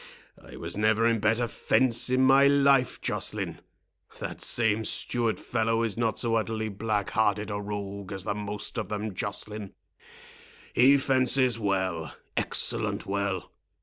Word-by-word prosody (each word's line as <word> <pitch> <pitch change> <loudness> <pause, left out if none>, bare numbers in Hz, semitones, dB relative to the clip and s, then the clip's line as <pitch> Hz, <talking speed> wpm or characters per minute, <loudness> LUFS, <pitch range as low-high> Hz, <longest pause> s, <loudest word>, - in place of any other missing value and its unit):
—I - - -12
was - - -4
never 110 +2 +2
in 115 -1 +2
better 115 +3 +1
fence 120 0 +1
in 130 +1 +3
my 135 +1 +6
life, 140 -2 +3
Joceline. - - -3 0.6
That - - -6
same 110 -2 +1
steward 115 +1 -1
fellow 115 -1 0
is 110 -4 -1
not 115 -1 0
so 115 -2 0
utterly 110 -1 -1
black 105 -1 -2
hearted 105 -1 +1
a 100 0 -3
rogue 100 -1 -6
as 95 -2 -4
the 100 - -1
most 105 +2 -3
of 110 - -4
them, 105 0 -3
Joceline. 105 +1 -4 1.0
He 135 +3 +6
fences 130 -2 +2
well—excellent 95 -5 -1
well. 100 -2 -2
110 Hz, 140 wpm, -27 LUFS, 100-120 Hz, 1.0 s, my